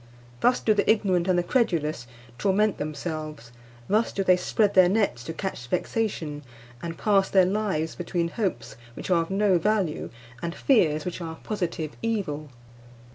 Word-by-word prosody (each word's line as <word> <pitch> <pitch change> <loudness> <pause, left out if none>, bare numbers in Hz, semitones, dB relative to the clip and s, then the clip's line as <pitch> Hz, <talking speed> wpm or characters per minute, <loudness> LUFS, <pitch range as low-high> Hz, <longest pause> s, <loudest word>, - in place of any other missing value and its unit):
Thus 245 - +3
do 215 - +3
the 205 - +1
ignorant 190 -5 +2
and 185 -1 +3
the 175 - +2
credulous 160 - 0 0.3
torment 205 +3 +2
themselves; 155 -4 -5 0.4
thus 215 +3 +2
do 195 - -1
they 185 -1 +5
spread 205 +3 +1
their 185 -2 +6
nets 195 - +1
to - - -4
catch 165 -7 -5
vexation, 170 - -2 0.4
and 165 -1 -5
pass 200 -2 +2
their 190 -2 +5
lives 190 -5 -1
between 175 -1 -2
hopes 170 - -3 0.2
which - - -5
are 170 -2 +4
of 165 - -5
no 195 -2 +3
value 195 -4 0 0.3
and 170 0 -3
fears 155 - +2
which 180 0 -4
are 165 -1 -5
a - - -16
positive 170 -7 -3
evil. 185 -10 -2
180 Hz, 165 wpm, -26 LUFS, 160-205 Hz, 0.4 s, their